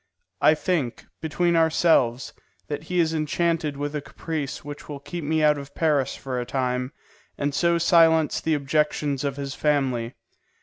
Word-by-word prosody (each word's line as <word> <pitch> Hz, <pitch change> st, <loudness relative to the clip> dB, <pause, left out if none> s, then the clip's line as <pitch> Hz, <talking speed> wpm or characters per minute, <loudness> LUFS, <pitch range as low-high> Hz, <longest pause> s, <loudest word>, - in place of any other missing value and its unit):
I 155 Hz, -, +6 dB
think, 155 Hz, -8 st, -2 dB, 0.2 s
between 170 Hz, +2 st, +1 dB
ourselves, 160 Hz, -6 st, +2 dB, 0.4 s
that 145 Hz, +1 st, -4 dB
he 180 Hz, +2 st, -1 dB
is 165 Hz, -1 st, +2 dB
enchanted 155 Hz, -1 st, 0 dB
with 145 Hz, +1 st, -3 dB
a 150 Hz, -, -2 dB
caprice 145 Hz, -2 st, -5 dB
which 145 Hz, +1 st, -9 dB
will 145 Hz, -1 st, -6 dB
keep 170 Hz, +4 st, -6 dB
me 155 Hz, +1 st, +1 dB
out 150 Hz, -1 st, +4 dB
of 140 Hz, 0 st, -11 dB
Paris 145 Hz, -5 st, +1 dB
for 130 Hz, -2 st, -4 dB
a -, -, -1 dB
time, 125 Hz, 0 st, -2 dB, 0.5 s
and 145 Hz, 0 st, -1 dB
so 170 Hz, +3 st, +2 dB
silence 165 Hz, -3 st, +4 dB
the 160 Hz, -1 st, +1 dB
objections 145 Hz, -1 st, 0 dB
of 140 Hz, -1 st, -2 dB
his 140 Hz, -1 st, -4 dB
family. 130 Hz, -6 st, 0 dB
150 Hz, 165 wpm, -24 LUFS, 140-160 Hz, 0.5 s, I